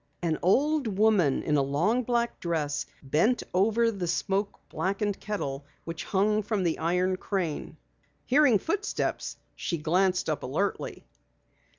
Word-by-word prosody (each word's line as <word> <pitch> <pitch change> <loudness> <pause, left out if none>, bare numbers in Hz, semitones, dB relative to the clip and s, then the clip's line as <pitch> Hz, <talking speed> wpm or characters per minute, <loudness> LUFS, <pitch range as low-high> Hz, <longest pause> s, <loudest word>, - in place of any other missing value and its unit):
An 160 -2 0
old 265 - +2
woman 205 -10 +3
in 150 -1 +2
a - - +4
long 165 - +1
black 235 -1 -1
dress 150 -4 -1 0.2
bent 165 - +2
over 225 +5 +3
the 190 -5 -3
smoke 195 +4 -1
blackened 200 +1 -1
kettle 145 -10 -3 0.2
which 165 0 -6
hung 210 +2 +2
from 205 -2 -1
the 170 -2 0
iron 180 +3 +1
crane. 185 -6 -3 0.5
Hearing 270 -4 +5
footsteps, 405 - -2 0.2
she 170 - -2
glanced 180 +4 +1
up 155 -2 -1
alertly. 190 +10 -2
190 Hz, 130 wpm, -28 LUFS, 165-215 Hz, 0.5 s, Hearing